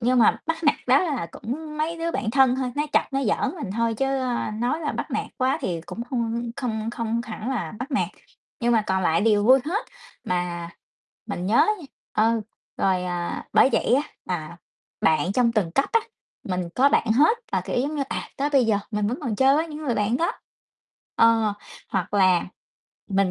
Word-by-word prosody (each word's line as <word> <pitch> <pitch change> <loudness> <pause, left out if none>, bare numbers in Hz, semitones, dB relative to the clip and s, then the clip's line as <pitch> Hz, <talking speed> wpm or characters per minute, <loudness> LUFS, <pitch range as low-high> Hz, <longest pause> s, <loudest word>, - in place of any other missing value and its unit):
nhưng 250 +1 +3
mà 225 - +5
bắt 325 0 -2
nạt 295 - +5
đó 260 +3 +6
là 280 - -2
cũng 300 - -6
mấy 330 +2 -1
đứa 335 0 -1
bạn 220 - -2
thân 260 0 +4
thôi, 255 -2 -2
nó 295 - +2
chọc, - - +5
nó 270 - +1
giỡn 210 - 0
mình 200 - -5
thôi 230 -1 +1
chứ, 270 +5 0
ơ, 245 -3 -1
nói 250 +7 0
là 300 - -2
bắt - - -4
nạt - - -1
quá 260 +3 +2
thì 175 -9 -2
cũng 235 - -5
hông, 230 -3 -1
ơ, 235 - -1 0.2
không 225 -3 -2
không 230 0 -2
hẳn 225 +1 -5
là 260 -3 -2
bắt 260 +4 -5
nạt, 265 - +1 0.5
nhưng 240 +1 +2
mà 225 -2 +4
còn 190 0 +1
lại 165 -1 +2
đều 210 -1 +3
vui 260 +4 +7
hết. 380 +9 -2 0.4
Mà 175 -1 -2 0.6
mình 180 +1 -4
nhớ 220 +4 +2
á - - +6
nha, 310 - -10 0.3
ơ, 225 +1 +2 0.4
rồi, 185 -1 +1
à 175 -1 -3
bởi - - +6
vậy - - +3
á, 280 - +3 0.2
là 170 -2 -4 0.4
bạn 170 +4 +2
trong 235 0 +3
từng 200 -7 +1
cấp 275 +10 +1
á, 455 - +5 0.4
mình 180 -2 -2
có 275 +3 +5
bạn 240 - +2
hết 310 - +4
là, - - +2
kiểu, - - -2
giống 285 +4 -2
như, 280 - 0
à, - - -4
tới 285 +2 0
bây 275 -4 +4
giờ 215 -2 +3
mình 210 -1 0
vẫn 245 +6 -2
còn 240 -7 -2
chơi 270 +3 +5
với 320 - +1
những 300 - -7
người 245 - 0
bạn 210 +3 +1
đó. 335 - 0 0.8
Ờ, 225 -2 +4 0.4
hoặc 190 0 -2
là 185 -3 +4 0.7
mình 195 -1 +2
235 Hz, 215 wpm, -24 LUFS, 205-270 Hz, 0.8 s, vui